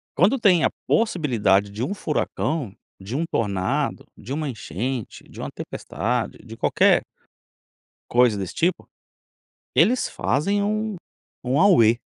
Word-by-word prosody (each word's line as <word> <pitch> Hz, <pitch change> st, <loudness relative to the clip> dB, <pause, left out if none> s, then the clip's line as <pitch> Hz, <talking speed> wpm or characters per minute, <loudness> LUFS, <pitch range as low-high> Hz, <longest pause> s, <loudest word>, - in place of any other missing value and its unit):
Quando 205 Hz, -, +3 dB
tem 185 Hz, -7 st, +4 dB
a -, -, +4 dB, 0.2 s
possibilidade 120 Hz, -, +2 dB
de 105 Hz, +4 st, -4 dB
um 185 Hz, -, -1 dB
furacão, 150 Hz, -, -2 dB, 0.3 s
de 100 Hz, +6 st, -6 dB
um 155 Hz, -, 0 dB
tornado, 95 Hz, -4 st, -1 dB
de 115 Hz, -, -10 dB
uma 155 Hz, +1 st, -2 dB
enchente, 115 Hz, +2 st, -5 dB
de -, -, -12 dB
uma -, -, -4 dB
tempestade, 120 Hz, 0 st, -3 dB
de 115 Hz, -1 st, -11 dB
qualquer 195 Hz, -, +3 dB, 1.1 s
coisa 120 Hz, -3 st, +4 dB
desse 95 Hz, -3 st, -5 dB
tipo, 175 Hz, +3 st, 0 dB, 0.9 s
eles 250 Hz, +3 st, +3 dB
fazem 200 Hz, +11 st, 0 dB
um 215 Hz, 0 st, -1 dB, 0.5 s
um 130 Hz, +3 st, +2 dB
auê. 120 Hz, -, +5 dB
130 Hz, 130 wpm, -23 LUFS, -, 1.1 s, auê